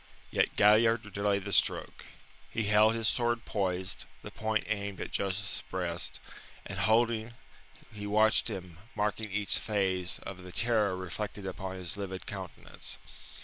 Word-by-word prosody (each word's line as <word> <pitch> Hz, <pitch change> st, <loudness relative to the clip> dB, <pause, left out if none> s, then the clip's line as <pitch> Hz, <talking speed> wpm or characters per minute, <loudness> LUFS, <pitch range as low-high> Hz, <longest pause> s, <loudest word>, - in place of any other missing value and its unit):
Yet -, -, +2 dB
Galliard 110 Hz, 0 st, +5 dB
delayed 100 Hz, -1 st, +1 dB
the 100 Hz, -, -3 dB
stroke. -, -, +1 dB, 0.4 s
He 115 Hz, -, -1 dB
held 105 Hz, +2 st, +5 dB
his 115 Hz, -1 st, +1 dB
sword 120 Hz, -1 st, +1 dB
poised, 95 Hz, -2 st, -1 dB, 0.2 s
the -, -, -7 dB
point 110 Hz, 0 st, 0 dB
aimed 100 Hz, -2 st, -2 dB
at -, -, -5 dB
Joseph's 100 Hz, +1 st, 0 dB
breast, 90 Hz, -2 st, -1 dB, 0.5 s
and -, -, -5 dB
holding, 115 Hz, 0 st, +2 dB, 0.6 s
he 105 Hz, -1 st, -5 dB
watched 110 Hz, +2 st, +4 dB
him, 90 Hz, -6 st, -6 dB, 0.2 s
marking 105 Hz, 0 st, -1 dB
each 105 Hz, +1 st, +1 dB
phase 95 Hz, -4 st, 0 dB
of 95 Hz, -1 st, -7 dB
the 90 Hz, 0 st, -9 dB
terror 105 Hz, -4 st, +2 dB
reflected 100 Hz, +2 st, -5 dB
upon 95 Hz, 0 st, -4 dB
his 90 Hz, 0 st, -4 dB
livid 95 Hz, -2 st, -5 dB
countenance. -, -, -6 dB
100 Hz, 145 wpm, -31 LUFS, 95-110 Hz, 0.6 s, Galliard